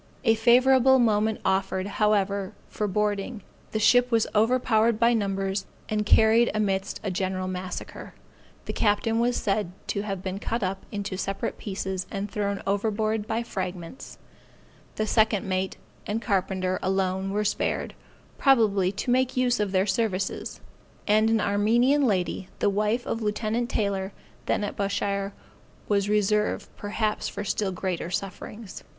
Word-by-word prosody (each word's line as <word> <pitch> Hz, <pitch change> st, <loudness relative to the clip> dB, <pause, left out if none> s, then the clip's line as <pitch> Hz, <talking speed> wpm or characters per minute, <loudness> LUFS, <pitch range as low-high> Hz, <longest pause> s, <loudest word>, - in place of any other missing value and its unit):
A 225 Hz, -, +5 dB
favorable 255 Hz, +3 st, +5 dB
moment 220 Hz, -2 st, +2 dB
offered, 190 Hz, 0 st, 0 dB
however, 200 Hz, -1 st, 0 dB, 0.2 s
for 210 Hz, -, -2 dB
boarding; 205 Hz, +2 st, -1 dB, 0.3 s
the -, -, -1 dB
ship 245 Hz, +3 st, +5 dB
was 230 Hz, -2 st, +3 dB
overpowered 225 Hz, 0 st, +3 dB
by 235 Hz, 0 st, +4 dB
numbers, 195 Hz, -2 st, -1 dB, 0.2 s
and 210 Hz, -1 st, -1 dB
carried 225 Hz, +2 st, +5 dB
amidst 195 Hz, -2 st, -1 dB
a 200 Hz, -, -2 dB
general 185 Hz, 0 st, -2 dB
massacre. 185 Hz, -1 st, -6 dB, 0.5 s
The -, -, -4 dB
captain 225 Hz, +1 st, +1 dB
was 240 Hz, +1 st, +1 dB
said 200 Hz, -3 st, -1 dB, 0.2 s
to 200 Hz, -, -1 dB
have 195 Hz, -3 st, -4 dB
been 190 Hz, +1 st, -3 dB
cut 230 Hz, +1 st, -2 dB
up 190 Hz, +1 st, -3 dB
into 205 Hz, -2 st, -4 dB
separate 195 Hz, +1 st, -3 dB
pieces, 190 Hz, -2 st, -4 dB
and 200 Hz, +1 st, -4 dB
thrown 200 Hz, -1 st, -2 dB
overboard 215 Hz, +1 st, 0 dB
by 225 Hz, +1 st, -1 dB
fragments; 185 Hz, -2 st, -6 dB, 0.8 s
the 215 Hz, -, 0 dB
second 215 Hz, -2 st, +2 dB
mate 185 Hz, 0 st, -1 dB, 0.3 s
and 210 Hz, +2 st, -1 dB
carpenter 190 Hz, -4 st, -1 dB
alone 190 Hz, 0 st, 0 dB
were 210 Hz, +2 st, -1 dB
spared, -, -, -1 dB, 0.5 s
probably 210 Hz, -9 st, +4 dB
to 225 Hz, +5 st, -2 dB
make 255 Hz, +1 st, +1 dB
use 245 Hz, -2 st, +2 dB
of 205 Hz, -2 st, 0 dB
their 190 Hz, 0 st, +2 dB
services; 195 Hz, -2 st, -2 dB, 0.5 s
and 215 Hz, +1 st, +4 dB
an 225 Hz, 0 st, +3 dB
Armenian 235 Hz, +8 st, +3 dB
lady, 185 Hz, -2 st, -1 dB
the 205 Hz, -, +2 dB
wife 210 Hz, +4 st, 0 dB
of 230 Hz, -, -3 dB
Lieut. 220 Hz, +3 st, -1 dB
Taylor, 200 Hz, -2 st, -1 dB, 0.3 s
then -, -, +1 dB
at 205 Hz, -, -3 dB
Bushire, 200 Hz, 0 st, -1 dB, 0.6 s
was 200 Hz, -1 st, +1 dB
reserved 210 Hz, 0 st, +1 dB
perhaps 210 Hz, +1 st, -2 dB
for -, -, -5 dB
still 200 Hz, 0 st, -1 dB
greater 180 Hz, -2 st, -3 dB
sufferings. 195 Hz, +3 st, -6 dB
205 Hz, 145 wpm, -26 LUFS, 195-225 Hz, 0.8 s, A